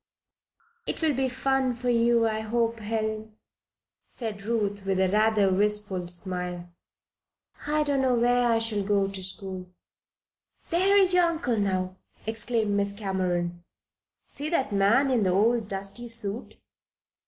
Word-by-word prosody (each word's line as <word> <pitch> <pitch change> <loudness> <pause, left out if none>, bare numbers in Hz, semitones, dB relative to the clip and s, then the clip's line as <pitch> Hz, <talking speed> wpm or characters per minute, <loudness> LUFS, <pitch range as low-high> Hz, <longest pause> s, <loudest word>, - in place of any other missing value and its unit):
"It - - -3
will 310 -2 +3
be 265 0 0
fun 265 0 0
for 245 +1 -1
you, 235 -1 +3
I 220 -1 -1
hope, 230 +1 -1
Helen," 220 0 -3 0.7
said 220 -4 -5
Ruth, 205 -2 -1
with 195 -1 0 0.2
rather 215 -1 +3
a - - +1
wistful 205 -2 0
smile. 180 -1 -6 0.9
"I 300 0 +2
don't 285 -2 +1
know 255 -2 +2
where 245 +1 +3
I 230 - +3
shall 225 -2 0
go 200 -1 +2
to 195 -1 -6
school." 190 -1 -5 1.0
"There 380 +4 +4
is 380 -2 +5
your 360 -1 +5
uncle 320 -9 -1
now!" 185 -2 -1 0.3
exclaimed 220 0 0
Miss 200 0 0
Cameron. 180 -4 -2 0.6
"See 295 +2 -3
that 270 -10 0
man 225 +8 +3
in 245 -3 +2
the 190 - +2
old 220 +4 +2
dusty 195 +4 -4
suit?" 230 -1 -2
220 Hz, 140 wpm, -27 LUFS, 195-245 Hz, 1.0 s, is